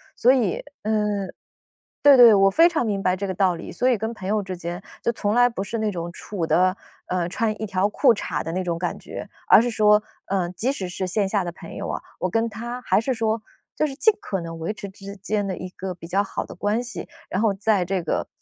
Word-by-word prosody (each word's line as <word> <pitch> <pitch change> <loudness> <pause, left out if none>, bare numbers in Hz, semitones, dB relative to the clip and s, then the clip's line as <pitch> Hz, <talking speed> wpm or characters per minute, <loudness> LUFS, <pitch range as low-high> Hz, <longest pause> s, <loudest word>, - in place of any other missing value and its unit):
所 250 - +5
以， 235 -9 +1 0.2
呃 210 -2 0 0.7
对 285 -2 +8
对， 235 -3 +9
我 195 -1 +5
非 330 - +6
常 325 -8 0
明 200 -3 -1
白 185 0 +2
这 200 +1 -3
个 190 - -2
道 185 -1 +2
理。 - - -8
所 250 - 0
以 245 - +3
跟 220 +2 -3
朋 190 -4 -7
友 210 +1 +1
之 185 -1 -5
间 175 +2 -5 0.2
就 - - 0
从 210 -2 -1
来 245 +1 +6
不 195 -4 -4
是 230 +3 -4
那 220 -1 0
种 175 -2 -5
处 180 -1 -4
得， 185 +3 +3 0.3
呃， 180 -2 -1
穿 215 +1 -1
一 - - -1
条 195 0 +1
裤 240 +3 +4
衩 - - -5
儿 - - -1
的 165 - -4
那 185 - -1
种 170 -2 -2
感 175 +1 -2
觉， - - -8 0.2
而 - - +8
是 245 - 0
说， 210 -1 +5 0.3
呃， 185 -3 0
即 215 +8 -2
使 190 -9 -4
是 185 +1 -3
线 195 +2 0
下 200 -2 +1
的 175 - -3
朋 - - -10
友 - - -4
啊， - - -3 0.2
我 - - 0
跟 230 0 +1
他 240 +3 -6
还 - - +2
是 260 +4 0
说， 225 -1 0 0.3
就 305 - +1
是 270 - -7
尽 440 +9 +4
可 195 - -3
能 165 -1 -7
维 165 +6 -2
持 200 -1 -8
之 200 +1 -10
间 205 +1 -2
的 190 - -2
一 185 - -6
个 185 0 -6
比 165 - -11
较 195 +3 +2
好 200 - -4
的 - - -10
关 210 +6 0
系。 245 - -6 0.2
然 190 - -1
后 220 -3 +3
在 200 -1 +1
这 190 +1 -1
个 165 - -1
200 Hz, 275 characters per minute, -23 LUFS, 185-225 Hz, 0.7 s, 对